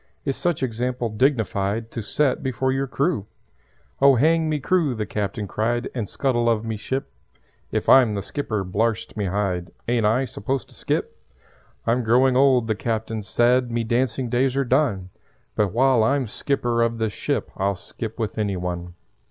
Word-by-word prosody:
Is 135 -2 0
such 175 -6 -1
example 125 0 -2
dignified 110 -3 0
To 115 - -4
set 135 +6 0
before 130 0 -1
your 135 +1 -1
crew?" 140 - -1 0.7
"Oh 140 -1 +7
hang 160 +5 +3
me 155 -1 0
crew," 155 -3 +1
the 110 -1 -2
Captain 105 0 -3
cried, 120 +5 -1
"And 115 -6 -3
scuttle 120 -4 +1
of 115 -1 +1
me 110 -1 -2
ship. 130 - -4 0.6
If - - -1
I'm 125 -5 +6
the 100 - -3
skipper, 110 -8 -3
blarst 110 +4 -1
me 105 -2 -1
hide! 95 -2 -1 0.2
Ain't 115 -2 +2
I 120 +5 +2
supposed 130 +1 -3
to - - -18
skip? - - -2 0.7
"I'm 120 +2 +2
growing 125 +3 +3
old," 130 -3 +4
the 110 - +1
Captain 110 0 -3
said; 120 +4 +2
"Me 120 0 -1
dancing 120 +2 0
days 130 +2 +1
are 140 - +2
done; 120 -9 +1 0.4
But 105 -3 +1
while 130 0 +4
I'm 135 +3 +2
skipper 120 0 -1
of 115 0 +1
this 110 -2 -1
ship - - -2
I'll 100 +1 0
skip 110 +4 -7
with 110 -1 -3
any 100 -3 0
one. 90 -1 -4
115 Hz, 175 wpm, -23 LUFS, 105-130 Hz, 0.7 s, Oh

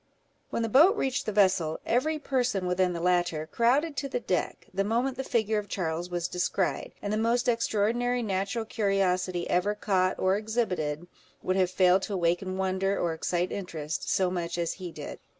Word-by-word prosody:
When 230 - -1
the - - 0
boat 310 - +6
reached 265 - -1
the - - +1
vessel, 185 -6 +2
every 285 +7 +1
person 250 -9 0
within 180 0 +1
the 170 - -4
latter 175 -3 +1
crowded 265 - +1
to 275 - -2
the 245 - -1
deck, 185 -6 -2
the 195 +1 +1
moment 240 +5 0
that 265 - -4
the - - -12
figure 220 -2 +1
of 205 - -7
Charles 170 -2 -2
was 175 -1 -2
descried; 180 +1 -1
and 205 0 -1
the - - +1
most 235 +2 +1
extraordinary 235 +1 +1
natural 200 +2 -2
curiosity 190 -5 0
ever 200 +4 +1
caught, 185 -3 +1
or 190 +1 +2
exhibited, 180 -8 -2 0.4
would 185 - 0
have 185 -2 +2
failed 185 0 +4
to 200 0 -3
awaken 180 +2 0
wonder, 190 +1 0
or 170 -1 0
excite 175 +2 -1
interest, 160 -6 -4
so 185 -2 +2
much 170 -1 -3
as 170 -1 -1
he 180 -3 -7
did. - - -8
195 Hz, 185 wpm, -28 LUFS, 180-230 Hz, 0.4 s, boat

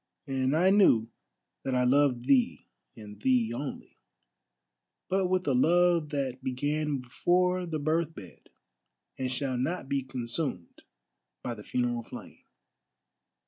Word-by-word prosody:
And 135 +1 0
I 185 +3 +4
knew 120 - +4 0.5
that 130 - -1
I 125 - +3
loved 125 -1 +3
thee, 125 - +2 0.3
and 105 -1 -11
thee 120 -2 +2
only, 135 +3 -7 1.1
but 190 0 +2
with 185 0 0
a 140 - +3
love 170 +3 +3
that 135 -3 -3
began 145 +2 -1
before 180 +8 +1
the 160 -2 -2
birth 155 +2 0
bed, 90 - -13 0.7
and 130 -1 -1
shall 130 -1 -2
not 150 +3 -2
be 140 0 0
consumed 125 - -4 0.6
by 120 - -3
the 105 - -10
funeral 120 0 -1
flame." - - -11
135 Hz, 130 wpm, -29 LUFS, 125-160 Hz, 1.1 s, I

